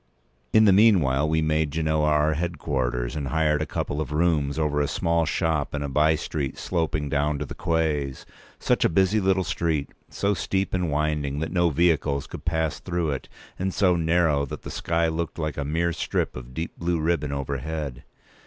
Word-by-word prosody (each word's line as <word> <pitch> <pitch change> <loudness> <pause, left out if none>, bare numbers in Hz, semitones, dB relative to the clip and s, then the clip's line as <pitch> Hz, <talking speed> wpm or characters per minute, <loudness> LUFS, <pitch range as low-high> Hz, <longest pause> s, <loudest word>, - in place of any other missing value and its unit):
In 110 - +6
the 100 - +6
meanwhile 80 -10 +4
we 80 0 +2
made 80 0 +1
Genoa 80 0 0
our 75 0 +3
headquarters, 70 -7 -2
and 70 -3 -3
hired 75 +1 +1
a - - -2
couple 75 - -2
of 75 - -5
rooms 75 -3 +1
over 75 -2 +1
a 70 - +1
small 85 +1 0
shop 80 -4 0
in 70 - -2
a - - -2
by 75 +3 +3
street 75 -3 -3
sloping 80 -4 -1
down 75 +1 0
to - - -3
the - - -7
quays. 75 -5 -1 0.3
Such - - +1
a - - +4
busy 95 +5 +3
little 95 -1 +2
street—so 85 +3 -2
steep 95 0 -1
and 90 -2 0
winding 75 -1 -1
that 80 - -3
no 85 -2 +3
vehicles 75 -3 +1
could - - -9
pass 80 -2 0
through 85 -3 -2
it, 70 - -5 0.3
and 95 0 -2
so 90 -3 +3
narrow 80 -3 +2
that - - -7
the - - -7
sky 85 0 0
looked 80 0 -3
like 75 -2 -2
a - - -1
mere 85 +4 0
strip - - -2
of 65 0 -9
deep 80 +3 -5
blue 85 0 0
ribbon 75 -2 0
overhead! 70 0 -4
80 Hz, 190 wpm, -25 LUFS, 75-85 Hz, 0.3 s, In